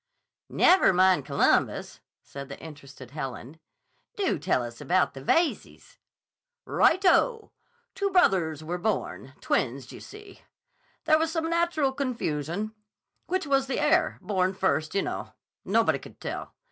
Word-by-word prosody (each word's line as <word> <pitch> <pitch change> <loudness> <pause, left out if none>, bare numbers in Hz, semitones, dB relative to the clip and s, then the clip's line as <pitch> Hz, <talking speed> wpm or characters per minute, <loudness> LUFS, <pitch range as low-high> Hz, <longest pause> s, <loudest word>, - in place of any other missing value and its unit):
"Never 370 - +5
mind 185 -4 +3
Columbus," - - +1 0.2
said 140 0 -9
the 140 - -8
interested 140 -5 -12
Helen. 135 0 -7 0.6
"Do 395 -2 0
tell 125 - 0
us 120 0 -8
about 185 +1 +1
the 135 - -9
Veyzes." 325 - -1 0.7
"Right 370 +4 +3
o! 450 +4 +3 0.4
Two 400 0 -1
brothers 180 - +2
were 175 +3 -4
born—twins, 135 - -2
d' - - -14
you - - -10
see? 415 -1 -13 0.6
There 310 -1 +4
was 320 0 0
some 325 -1 -1
natural 335 -5 +1
confusion. 215 - -3 0.5
Which 370 -2 -1
was 270 -1 +1
the 265 - -2
heir—born 200 - +1
first, 185 -3 0
you 200 - +2
know? - - -5 0.3
Nobody - - +2
could - - -14
tell. - - -6
195 Hz, 135 wpm, -27 LUFS, -, 0.7 s, Never